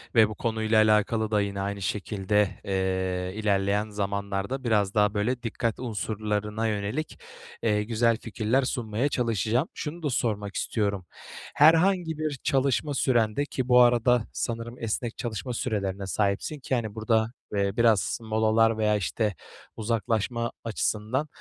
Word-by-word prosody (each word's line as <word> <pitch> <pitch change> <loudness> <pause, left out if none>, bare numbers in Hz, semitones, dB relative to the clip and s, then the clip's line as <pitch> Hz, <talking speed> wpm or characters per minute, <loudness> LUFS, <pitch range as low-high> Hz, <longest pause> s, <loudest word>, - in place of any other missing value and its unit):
ve 110 -1 +6
bu 105 - -6
konuyla 110 -1 0
alakalı 110 +1 +2
da 105 -1 +3
yine 100 -1 -3
aynı 100 0 -3
şekilde, 100 +1 0
eee, 95 0 -1
ilerleyen 100 0 +1
zamanlarda 100 +4 -3
biraz 105 -4 +1
daha, 105 -1 +3
böyle, 120 +5 -1
dikkat 115 0 -2
unsurlarına 105 -1 -2
yönelik, 105 +9 -3 0.4
eee, 105 -2 +2
güzel 115 +1 +2
fikirler 115 +3 0
sunmaya 120 +1 -1
çalışacağım. 115 - 0
Şunu 165 +2 -6
da 145 - 0
sormak 105 -5 -1
istiyorum: 100 -4 -1 0.5
Herhangi 165 +1 +4
bir 155 -3 -3
çalışma 140 +1 +1
sürende 120 0 +1
ki 130 -3 -3
bu 125 0 +6
arada 120 -1 +4 0.5
esnek 115 +1 -3
çalışma 120 +1 -4
sürelerine 100 -6 -2
sahipsin 100 - -1
ki 130 0 -1
hani, 110 -2 -3
burada, 110 0 +1 0.2
eee, 100 0 +1
biraz 115 -1 +3
molalar 110 0 +2
veya, 105 -1 +2
işte, 105 +1 -1 0.4
uzaklaşma 115 +1 -1
açısından, 115 +5 -1
110 Hz, 130 wpm, -27 LUFS, 105-120 Hz, 0.5 s, ve